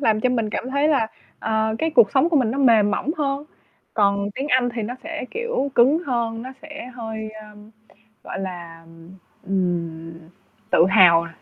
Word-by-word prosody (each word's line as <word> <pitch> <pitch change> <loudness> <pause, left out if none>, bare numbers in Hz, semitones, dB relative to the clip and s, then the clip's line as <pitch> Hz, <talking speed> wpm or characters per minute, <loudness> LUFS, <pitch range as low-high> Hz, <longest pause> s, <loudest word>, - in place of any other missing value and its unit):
làm 220 -5 +2
cho 255 - +2
mình 230 -4 -1
cảm 255 +4 -4
thấy 280 +2 +2
là, 275 -8 +2 0.3
ờ, 220 0 0
cái 320 - 0
cuộc 235 -9 +5
sống 275 +5 +3
của 330 - +1
mình 250 -6 +2
nó 265 - -3
mềm 225 -6 +4
mỏng 255 +7 -1
hơn. 280 -1 -2 0.5
Còn 200 -1 +1
tiếng 275 +2 -4
Anh 255 -2 +3
thì 230 - -3
nó 230 +4 -4
sẽ, 325 -3 -5
kiểu, 470 - -2
cứng 265 +6 +5
hơn, 230 -2 -2
nó 255 - -7
sẽ 300 -2 -9
hơi, 220 -2 -6
ờ, 215 0 -12 0.8
gọi - - -6
là, 170 -3 -7 0.6
ừm, 170 -4 -2 0.6
tự - - +5
hào, 170 -4 +6
225 Hz, 180 wpm, -22 LUFS, 200-275 Hz, 0.8 s, hào